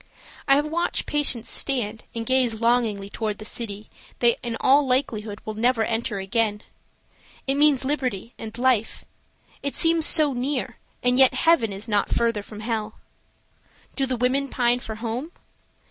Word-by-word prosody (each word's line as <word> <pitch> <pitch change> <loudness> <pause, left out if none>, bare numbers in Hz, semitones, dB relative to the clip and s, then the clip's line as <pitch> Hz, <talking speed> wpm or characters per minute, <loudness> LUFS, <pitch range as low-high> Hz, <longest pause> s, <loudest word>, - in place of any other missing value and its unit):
I 275 - +6
have 290 +1 +2
watched 335 +3 -1
patients 265 -6 0
stand 225 -5 -1
and 230 0 -3
gaze 250 -3 +2
longingly 230 -4 +1
toward 210 0 -3
the 215 - -10
city 215 -2 -5 0.3
they 240 -1 +4
in 235 -2 -3
all 280 +3 +5
likelihood 220 -5 -1
will 215 - -4
never 230 +1 +1
enter 225 -1 -2
again. 210 +2 -1 0.8
It 270 - +1
means 285 -2 +3
liberty 255 -6 -2
and 220 +1 -7
life; 245 -3 +1 0.6
it 280 - -3
seems 330 -2 +3
so 305 -4 +5
near, 255 -1 -2 0.3
and 250 +1 +3
yet 265 -1 +6
heaven 325 -10 +3
is 200 +4 -7
not 205 -2 +1
further 230 -3 +1
from 210 +1 -10
hell. 220 -1 -3 1.0
Do 270 -1 0
the 255 -1 -1
women 260 +3 +1
pine 245 -1 +1
for 220 -3 -7
home? 240 +9 -5
240 Hz, 160 wpm, -24 LUFS, 220-265 Hz, 1.0 s, I